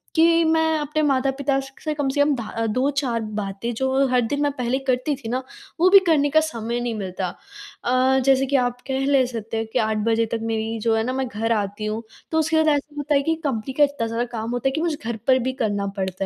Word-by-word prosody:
कि 330 +1 +5
मैं 320 0 +2
अपने 300 +1 -1
माता-पिता 270 0 +1
स 270 0 -8
से 305 -1 -1
कम 290 -2 -2
से 285 +1 +1
कम 290 0 +3
धा 230 -3 -5
अ, 225 0 -2
2-4 260 0 0 0.2
बातें 200 +4 -4
जो 265 +2 +1
हर 250 -1 +3
दिन 285 +6 -1
मैं 290 -1 +2
पहले 250 -1 -1
करती 255 +3 +1
थी 240 -4 -8
ना, 255 +2 -1 0.4
वो 365 +2 +5
भी 395 0 +9
करने 290 -3 +3
का 315 - +5
समय 235 -5 -3
नहीं 240 -1 -2
मिलता। 185 -2 -3 0.6
अ, 255 +2 +3
जैसे 270 0 +4
कि 280 +1 -1
आप 245 -1 +1
कह 265 0 -1
लें 275 -2 +4
सकते 225 -2 -5
हैं 225 - -1
कि - - +2
8 220 0 0
बजे 230 0 +2
तक 230 - -1
मेरी 225 0 -2
जो 225 -1 +2
है 220 - +1
ना 255 +2 -2
मैं 265 -1 -1
घर 225 +1 -2
आती 205 0 -1
हूँ, 215 +1 -2 0.3
तो 320 - +2
उसके 315 0 +1
बाद 315 0 +3
ऐसा 290 -1 +2
होता 290 0 0
है 280 - +4
कि 325 +2 +1
कंपनी 260 -2 -2
का 295 - +4
इतना 285 -5 0
सारा 230 +2 -1
काम 225 0 -3
होता 245 +2 -1
है - - +2
कि 315 - -2
मुझे 330 -3 -1
घर 235 -1 -2
पर 260 0 +5
भी 260 +1 -2
करना 205 -3 0
पड़ता 190 0 -2
260 Hz, 255 wpm, -23 LUFS, 225-285 Hz, 0.6 s, भी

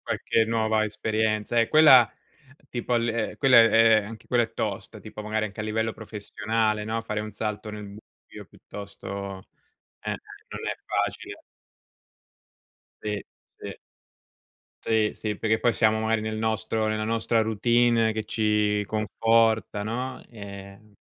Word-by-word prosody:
qualche 115 - 0
nuova 110 -1 +1
esperienza, 110 +1 -1
eh, 115 - +4
quella, 135 -7 +7 0.6
tipo 120 0 -2
l 115 -1 -1
quella 135 -3 +5
è 115 -1 +6
è - - -9
anche 110 +1 -11
quella 120 -2 +3
è - - -13
tosta, - - -4
tipo, - - -9
magari 110 0 -1
anche 100 +1 -13
a - - -3
livello 110 +1 -1
professionale, 110 0 -2
no, 115 +1 -2
fare 110 -1 -3
un 110 0 -6
salto 105 0 -4
nel 105 0 -7
buio, 100 +2 -14
piuttosto 100 -1 -8 0.6
eh - - -5 0.4
non - - -6
è - - -2
facile. - - -3 1.6
Sì, 105 -1 -3 0.3
sì. - - -8 1.1
Sì, 110 -1 +2
sì, 105 -2 -4
perché 110 0 +1
poi 120 - +2
siamo 110 0 +2
magari 110 0 0
nel 110 0 -3
nostro 110 0 -1
nella 110 0 -1
nostra 115 +1 +1
routine 115 +1 +2
che 110 0 -3
ci 105 -1 +1
conforta, 110 -1 +1
no? 125 +4 -4
Ehm, 100 -1 -11
110 Hz, 140 wpm, -26 LUFS, 105-115 Hz, 1.6 s, quella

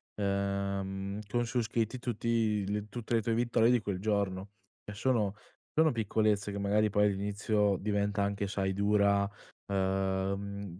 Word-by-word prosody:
ehm, 100 0 -2
con 120 +3 0
su 120 +1 0
scritti 115 +2 -1
tutti 115 -3 0
le 105 0 -2
tutte 120 +1 -3
le 115 - +3
tue 115 +1 0
vittorie 115 0 +3
di 120 -2 +3
quel 100 -3 -3
giorno. 100 -1 -1 0.3
E 105 - -7
sono 105 -3 +1 0.4
sono 160 0 +5
piccolezze 105 -2 +1
che 100 - -3
magari 105 +2 +2
poi 105 0 +3
all'inizio 100 +1 +1
diventa 100 0 0
anche, 100 0 -1
sai, 95 -1 -1
dura, 100 0 +3 0.4
ehm, 95 0 -1
100 Hz, 145 wpm, -31 LUFS, 100-110 Hz, 0.4 s, sono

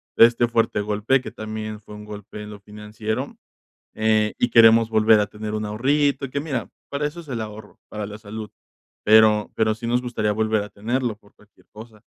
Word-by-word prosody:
de - - +9
este 120 0 +2
fuerte 115 -3 +1
golpe 105 +5 +1
que - - -8
también 110 0 -6
fue 105 0 -14
un 105 0 -10
golpe 105 0 -9
en 105 - -8
lo 105 -1 -10
financiero, 105 +1 -5 0.6
eh, 110 -1 +2
y 120 - +1
queremos 115 0 +6
volver 110 0 +5
a 105 - +1
tener 105 +1 -7
un 110 0 -2
ahorrito 140 +6 +1
y - - -14
que, 140 - -2
mira, 130 - -4 0.2
para 145 +1 -1
eso 165 +4 -12
es 155 - -15
el 120 -4 -3
ahorro, 105 -1 -9
para 105 -1 -5
la 105 +1 -9
salud, 110 0 -8 0.5
pero 110 0 +5
pero 110 -1 +2
sí 115 +1 -7
nos 120 +1 +2
gustaría 110 -4 -1
volver 110 0 +1
a 105 - -7
tenerlo 120 +1 -2
por 105 -1 -25
cualquier 105 0 -25
cosa, 110 0 -13
110 Hz, 205 wpm, -23 LUFS, 105-115 Hz, 0.6 s, de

